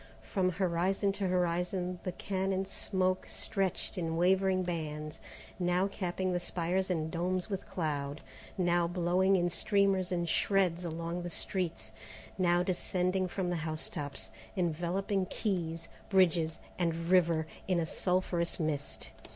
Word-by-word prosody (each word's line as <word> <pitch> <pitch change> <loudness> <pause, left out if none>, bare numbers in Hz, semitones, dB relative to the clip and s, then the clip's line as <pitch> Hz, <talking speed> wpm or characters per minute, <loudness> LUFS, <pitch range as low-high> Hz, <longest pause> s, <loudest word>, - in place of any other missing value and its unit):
From 185 - +1
horizon 190 +2 +1
to 195 -1 -2
horizon 180 0 0
the 185 - -3
cannon 190 +1 -1
smoke 185 -1 0
stretched 195 -1 -2
in 165 -1 -1
wavering 185 +1 +3
bands, 155 -3 -4 0.4
now 180 +1 +2
capping 185 -1 -2
the 175 - +1
spires 175 +2 -1
and 160 -3 0
domes 180 +3 -1
with 195 -1 -4
cloud, 145 -5 -2 0.4
now 175 -2 +3
blowing 180 +2 +3
in 175 -1 +3
streamers 195 0 +2
and 175 -1 0
shreds 180 -1 +2
along 170 +1 -3
the 175 - -4
streets, 170 - -3 0.4
now 175 -1 +3
descending 185 0 0
from 180 0 -2
the 175 - 0
housetops, 155 -3 -3 0.3
enveloping 180 +3 0
quays, 170 -6 -2 0.2
bridges, 170 -4 +3 0.2
and 165 -1 0
river, 170 -3 +4 0.2
in 185 -2 +2
a 165 - +1
sulphurous 180 0 0
mist. 150 -3 -2
180 Hz, 130 wpm, -32 LUFS, 170-185 Hz, 0.4 s, river